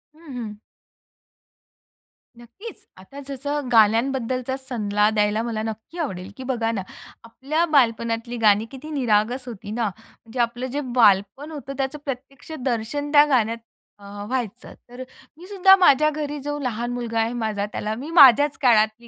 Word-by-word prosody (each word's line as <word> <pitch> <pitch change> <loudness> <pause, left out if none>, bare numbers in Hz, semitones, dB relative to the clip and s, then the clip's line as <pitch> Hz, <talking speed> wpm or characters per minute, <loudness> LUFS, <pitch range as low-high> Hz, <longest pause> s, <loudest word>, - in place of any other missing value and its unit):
हं, 315 -4 -13
हं. 210 -3 -6 1.8
नक्कीच. 240 - -12
आता 230 +10 -12
जसं 285 +1 -4
गाण्यांबद्दलचा 250 +3 +2
सल्ला 210 -5 0
द्यायला 210 0 +1
मला 225 -2 -3
नक्की 220 +9 -7
आवडेल, 190 - -4
की 260 - -7
बघा 235 -3 -1
ना, 200 -4 -3 0.4
आपल्या 275 +8 -2
बालपणातली 230 -2 +1
गाणी 215 -1 +3
किती 275 +3 -10
निरागस 245 -1 0
होती 210 -3 -8
ना, 230 0 -1
म्हणजे 225 +3 -13
आपलं 240 +1 -1
जे 290 +1 -2
बालपण 210 +6 +3
होतं 280 -3 -7
त्याचं 275 +2 -3
प्रत्यक्ष 275 +2 -7
दर्शन 265 +4 -2
त्या 290 -1 +7
गाण्यात 230 -4 +1 0.4
अ, 200 - -15 0.2
व्हायचं. 245 -1 -4 0.2
तर 245 +1 -10 0.4
मी 350 - -13
सुद्धा 385 -1 +6
माझ्या 305 -5 +4
घरी 295 -1 -4
जो 290 +1 -4
लहान 240 -2 -3
मुलगा 230 -2 -3
आहे 225 +1 0
माझा, 220 -4 -2
त्याला 215 +1 -3
मी 285 +5 -7
माझ्याच 285 +1 +7
काळातली 225 -1 +2
245 Hz, 150 wpm, -23 LUFS, 220-275 Hz, 1.8 s, त्या